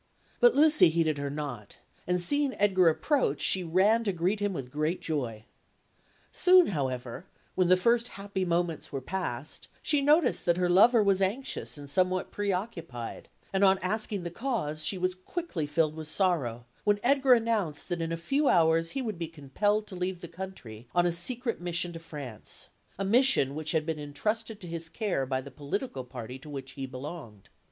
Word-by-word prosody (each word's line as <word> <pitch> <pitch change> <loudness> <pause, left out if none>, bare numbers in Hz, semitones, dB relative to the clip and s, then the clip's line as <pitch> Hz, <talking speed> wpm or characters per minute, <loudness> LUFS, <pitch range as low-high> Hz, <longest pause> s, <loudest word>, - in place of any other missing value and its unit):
But 485 -1 +6
Lucy 305 - +6
heeded 160 -2 +1
her 140 0 -2
not; 140 -8 -6 0.3
and 180 0 +1
seeing 285 +8 +1
Edgar 190 -4 +4
approach, 210 - +1
she 185 - +3
ran 195 +7 +3
to 200 - +2
greet 185 +4 0
him 205 0 0
with 135 -8 -6
great 155 +5 -1
joy. 120 -9 -3 0.9
Soon, 365 -1 +6
however, 130 -1 -3 0.3
when 185 -1 +2
the 185 +1 +5
first 235 +5 +2
happy 195 -1 -3
moments 170 -2 -1
were 135 - -3
passed, 150 -3 -4 0.2
she 295 -2 +3
noticed 295 0 +3
that 170 0 +3
her 180 -1 +1
lover 220 +5 +6
was 195 -1 +2
anxious 205 - -1
and 145 -1 -9
somewhat 185 +4 0
preoccupied; 180 - -4 0.2
and 195 +1 +2
on 190 0 +6
asking 205 0 -2
the 170 - -5
cause, 175 - -3
she 190 +5 -1
was 185 0 0
quickly 185 - -4
filled 155 0 +1
with 160 -1 -7
sorrow 150 - 0 0.2
when 205 -1 +2
Edgar 270 0 +5
announced 220 -10 -1
that 175 -2 -2
in 165 0 -2
a 165 - -1
few 275 - 0
hours 165 -1 +3
he 265 - -1
would 215 -7 -4
be 165 - -2
compelled 180 +8 -1
to 200 - -10
leave 180 0 -3
the 170 - -7
country 130 - -9
on 175 0 +4
a 175 - +2
secret 230 +6 -2
mission 175 0 -1
to 165 - -7
France, 145 -9 -8 0.3
a 195 - -2
mission 235 - +4
which 155 +1 -3
had 160 -2 +1
been 160 -2 -3
entrusted 215 +9 -3
to 180 - -9
his 165 -1 -6
care 180 - -1
by 130 0 -1
the 140 +1 -11
political 145 - -4
party 125 0 -8
to 150 - -12
which 135 -2 -6
he 135 0 -6
belonged. 130 - -9
175 Hz, 185 wpm, -29 LUFS, 150-205 Hz, 0.9 s, But